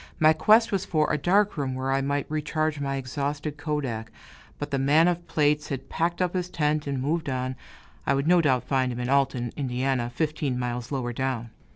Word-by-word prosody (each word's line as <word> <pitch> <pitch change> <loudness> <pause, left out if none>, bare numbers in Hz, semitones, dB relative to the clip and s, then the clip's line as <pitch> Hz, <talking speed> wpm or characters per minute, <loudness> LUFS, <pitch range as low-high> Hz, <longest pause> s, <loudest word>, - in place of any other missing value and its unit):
My 155 -1 +6
quest 220 +8 +4
was 195 -2 0
for 155 -6 +1
a - - +2
dark 195 +5 +2
room 135 -3 -2
where 130 +1 -2
I 135 0 +2
might 140 +1 -1
recharge 155 0 -1
my 140 -1 -2
exhausted 145 +3 -3
kodak; 130 -8 -3 0.5
but 145 0 -5
the 140 - 0
man 150 +5 +4
of 175 -1 -1
plates 150 -1 +1
had 135 -2 -5
packed 170 +2 0
up 180 - -1
his 180 -1 -2
tent 150 -3 0
and 140 -2 -1
moved 155 +3 -1
on 130 0 -2 0.5
I 140 - +3
would 140 +1 0
no 175 0 +6
doubt 130 -6 +2
find 130 -2 0
him 120 - -5
in 125 0 -2
Alton, 135 -3 +1
Ind., 130 -2 -1
fifteen 150 -4 -1
miles 125 0 -3
lower 125 -3 -2
down. 120 -2 -2
140 Hz, 205 wpm, -26 LUFS, 130-155 Hz, 0.5 s, My